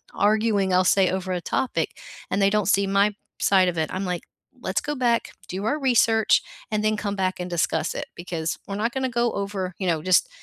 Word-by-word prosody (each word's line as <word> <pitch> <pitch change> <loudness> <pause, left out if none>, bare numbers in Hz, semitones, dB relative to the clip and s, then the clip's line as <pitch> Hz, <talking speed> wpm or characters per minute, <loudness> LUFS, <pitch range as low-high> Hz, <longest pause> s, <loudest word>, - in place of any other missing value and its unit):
arguing, 210 -2 +2
I'll 185 0 +4
say 190 0 +4
over 185 0 -2
a 180 - -1
topic 170 -4 -2 0.3
and 195 - 0
they 195 - +5
don't 210 -1 +1
see 200 0 +3
my 200 +1 +2 0.3
side 190 -2 +4
of 170 -2 -2
it, 155 - 0
I'm, 190 +1 -2
like, 180 -2 -2 0.4
let's 190 -1 -1
go 295 -1 -4
back, 240 -2 +1 0.2
do 190 +3 -4
our 295 +7 0
research, 230 -5 +3 0.3
and 215 0 0
then 215 0 +2
come 205 -1 -3
back 190 -1 -1
and 180 0 -4
discuss 165 -2 0
it - - -4
because 170 -2 -3
we're 195 - -5
not 230 +3 -1
gonna 265 -1 -1
go 240 -1 0
over, 195 -3 -3
you 190 - -2
know, 165 -3 +1
just 185 - +3
195 Hz, 220 wpm, -24 LUFS, 185-215 Hz, 0.4 s, they